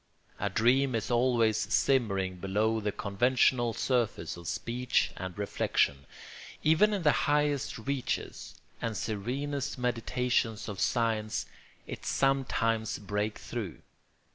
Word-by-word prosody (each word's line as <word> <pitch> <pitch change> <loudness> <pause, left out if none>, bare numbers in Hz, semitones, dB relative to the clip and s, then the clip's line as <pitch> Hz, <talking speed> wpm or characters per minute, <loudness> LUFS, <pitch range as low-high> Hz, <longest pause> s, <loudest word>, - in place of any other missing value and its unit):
A - - 0
dream 130 +3 +3
is 110 +1 -2
always 120 -3 +3
simmering 100 -5 +1
below 105 +4 0
the 105 -1 -1
conventional 120 +4 +2
surface 115 -9 -1
of 85 -1 -10
speech 120 +6 0
and 95 -1 -6
reflection. 70 -8 0 0.6
Even 160 +7 +5
in 200 -4 -1
the 150 - +6 0.2
highest 145 -2 +1
reaches 135 +3 -3 0.3
and 115 -3 -2
serenest 130 +9 -3
meditations 125 -2 0
of 100 -3 -5
science 110 -3 0 0.4
it - - -7
sometimes 120 -5 +1
breaks 105 +1 -3
through. 105 -9 -5
115 Hz, 115 wpm, -30 LUFS, 105-130 Hz, 0.6 s, the